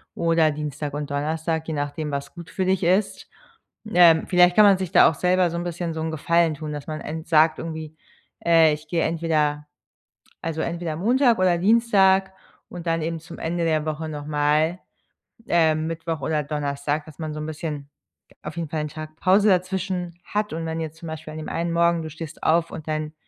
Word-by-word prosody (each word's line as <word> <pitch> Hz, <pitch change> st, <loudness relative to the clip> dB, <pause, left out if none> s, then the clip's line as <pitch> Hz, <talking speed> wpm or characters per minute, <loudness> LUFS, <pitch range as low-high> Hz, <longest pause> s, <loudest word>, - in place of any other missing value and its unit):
oder 165 Hz, -2 st, +2 dB
Dienstag 150 Hz, -1 st, -5 dB
und 145 Hz, 0 st, -4 dB
Donnerstag, 160 Hz, +2 st, -2 dB
je 160 Hz, -, -3 dB
nachdem, 145 Hz, +1 st, -3 dB
was 140 Hz, 0 st, -4 dB
gut 170 Hz, -1 st, -10 dB
für 190 Hz, -, -2 dB
dich 185 Hz, 0 st, +1 dB
ist. 190 Hz, +4 st, 0 dB, 0.6 s
Ähm, 170 Hz, -2 st, +6 dB
vielleicht 180 Hz, -1 st, +5 dB
kann 215 Hz, -, +7 dB
man 200 Hz, -2 st, +6 dB
sich 185 Hz, -2 st, -4 dB
da -, -, +7 dB
auch -, -, -3 dB
selber 180 Hz, +3 st, +2 dB
so 170 Hz, -, -3 dB
'n 170 Hz, -, -3 dB
bisschen 175 Hz, -1 st, -4 dB
so 160 Hz, -, -4 dB
'n 160 Hz, -, -2 dB
Gefallen 165 Hz, +1 st, +1 dB
tun, 155 Hz, +1 st, -6 dB
dass 145 Hz, -1 st, -7 dB
man 155 Hz, -1 st, -5 dB
ent 160 Hz, +1 st, -6 dB
sagt 160 Hz, -1 st, +4 dB
irgendwie, 160 Hz, -1 st, -6 dB, 0.5 s
äh: 165 Hz, -2 st, +5 dB
„Ich 150 Hz, +1 st, -7 dB
gehe 165 Hz, +1 st, 0 dB
entweder 155 Hz, -3 st, 0 dB, 0.8 s
also 160 Hz, -1 st, -2 dB
entweder 170 Hz, -2 st, -3 dB
Montag 240 Hz, -, +3 dB
oder 185 Hz, -2 st, +3 dB
Dienstag 195 Hz, -2 st, +3 dB, 0.4 s
und 175 Hz, -1 st, -8 dB
dann 165 Hz, 0 st, +1 dB
eben 165 Hz, +1 st, -3 dB
zum 165 Hz, +1 st, -11 dB
Ende 170 Hz, +1 st, -2 dB
der 155 Hz, -2 st, +1 dB
Woche 155 Hz, +1 st, -3 dB
nochmal, 150 Hz, +3 st, 0 dB, 0.7 s
ähm, 160 Hz, -2 st, +2 dB
Mittwoch 165 Hz, -1 st, -4 dB
oder 150 Hz, +2 st, -1 dB
Donnerstag.“ 145 Hz, 0 st, -2 dB
Dass 155 Hz, -, -14 dB
man 155 Hz, -1 st, -4 dB
so 150 Hz, -, -5 dB
'n 150 Hz, -, -4 dB
bisschen 150 Hz, -2 st, -5 dB, 0.6 s
auf -, -, -7 dB
jeden 165 Hz, -3 st, -3 dB
Fall 155 Hz, 0 st, -2 dB
'n 150 Hz, -, -3 dB
Tag 155 Hz, +1 st, -9 dB
Pause 200 Hz, +3 st, +4 dB
dazwischen 185 Hz, -1 st, -1 dB
hat 210 Hz, -2 st, -2 dB
und 165 Hz, +1 st, -4 dB
wenn 160 Hz, 0 st, -3 dB
jetzt 160 Hz, -1 st, -5 dB
zum 165 Hz, -, -9 dB
Beispiel 160 Hz, -1 st, -7 dB
an -, -, -7 dB
dem 155 Hz, -, -6 dB
einen 170 Hz, 0 st, -2 dB
Morgen 170 Hz, 0 st, +2 dB
du 160 Hz, -, -6 dB
stehst 160 Hz, 0 st, -9 dB
auf 165 Hz, +1 st, +2 dB
und 160 Hz, -1 st, -8 dB
dein 155 Hz, 0 st, -3 dB
160 Hz, 205 wpm, -23 LUFS, 155-175 Hz, 0.8 s, kann